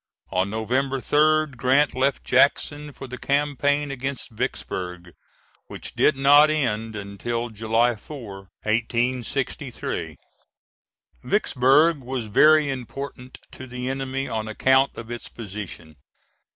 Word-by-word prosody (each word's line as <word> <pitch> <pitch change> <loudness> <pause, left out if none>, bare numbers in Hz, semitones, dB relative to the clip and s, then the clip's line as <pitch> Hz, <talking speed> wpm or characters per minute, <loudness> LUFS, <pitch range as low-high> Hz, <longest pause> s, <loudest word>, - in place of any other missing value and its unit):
On 95 +2 +1
November 130 +6 -1
3d, 155 +1 +2
Grant 130 +4 +3
left 135 +1 0
Jackson 145 +3 +2
for 135 - -9
the 125 0 -8
campaign 145 0 0
against 135 -1 -5
Vicksburg, 90 -4 -4 0.5
which - - -8
did 150 - +3
not 145 +3 +7
end 115 -7 -1
until 110 +4 -4
July 115 +2 +1
4, 110 -3 -9 0.3
1863. 120 +2 -2 1.1
Vicksburg 145 +5 +3
was 125 -2 -4
very 150 +8 +5
important 130 0 -6
to 130 - -10
the 125 +1 -5
enemy 135 0 -3
on 110 -1 -3
account 130 +5 +2
of 115 +1 -8
its 120 - -7
position. 95 -8 -8
130 Hz, 110 wpm, -24 LUFS, 110-140 Hz, 1.1 s, not